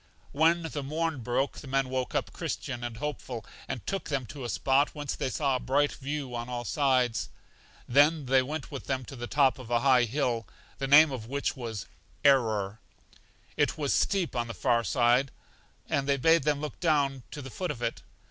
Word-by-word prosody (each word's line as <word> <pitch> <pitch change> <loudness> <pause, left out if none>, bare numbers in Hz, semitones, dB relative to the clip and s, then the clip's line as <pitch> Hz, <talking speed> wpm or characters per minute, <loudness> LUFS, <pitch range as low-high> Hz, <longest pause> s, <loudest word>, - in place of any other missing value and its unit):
When 165 +3 +3
the 155 -2 -4
morn 155 +1 -2
broke, 125 +4 -1
the 140 - -10
men 135 0 +1
woke 130 -1 -2
up - - -1
Christian 120 0 -4
and 120 -2 -5
Hopeful, 130 -5 -5 0.2
and 120 -8 -5
took 190 -6 -3
them 140 -3 -1
to 135 +3 -8
a 120 - -4
spot 135 +6 +2
whence 145 -1 -3
they 130 - -2
saw 135 0 0
a - - 0
bright 145 +3 +2
view 140 -2 -5
on 120 0 -4
all 120 -1 -4
sides. 130 -2 +1 0.6
Then 145 +3 +4
they 130 +1 +4
went 145 +3 -5
with 140 - -6
them 130 -2 -1
to 135 - -9
the 120 -1 -5
top 135 -1 +3
of 125 -3 -10
a 120 -1 +2
high 130 -3 +5
hill, 120 -3 -1 0.3
the 135 - -1
name 145 +2 +8
of 120 -4 -5
which 140 +3 -2
was 115 -7 -5 0.4
Error; 110 -7 +3 0.8
it - - +1
was 145 -3 0
steep 190 -8 +1
on 120 -1 -1
the 115 - -6
far 120 +5 +2
off 115 - -4
side, 120 +6 +3 0.6
and 140 0 0
they 140 - +3
bade 160 +2 +4
them 145 -1 +1
look 150 - -5
down 145 -6 +1
to - - -8
the 135 - -8
foot 180 +6 -3
of 120 - -4
it. 115 - -2
135 Hz, 205 wpm, -29 LUFS, 120-145 Hz, 0.8 s, name